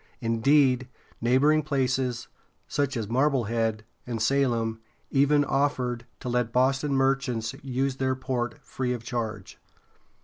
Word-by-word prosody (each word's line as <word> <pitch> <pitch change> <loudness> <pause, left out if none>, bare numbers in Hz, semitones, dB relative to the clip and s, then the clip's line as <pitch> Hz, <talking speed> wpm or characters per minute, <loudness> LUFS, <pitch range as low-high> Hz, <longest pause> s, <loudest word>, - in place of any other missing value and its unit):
Indeed, 130 +2 +3 0.3
neighboring 135 +6 +4
places, 130 -4 -1 0.4
such 140 -2 -1
as 110 -3 -3
Mar 130 +7 +3
ble 135 -5 0
head´ 115 0 -1 0.3
and 120 -2 -3
Salem, 115 -2 +1 0.3
even 145 +1 +4
offered 125 -4 0
to - - -6
let 120 -1 0
Boston 135 +3 +2
merchants 135 -4 0
use 135 0 -1
their 130 -1 0
port 125 -3 -3
free 125 -1 -2
of 120 -2 -6
charge. 110 -5 -5
125 Hz, 130 wpm, -27 LUFS, 115-135 Hz, 0.4 s, neighboring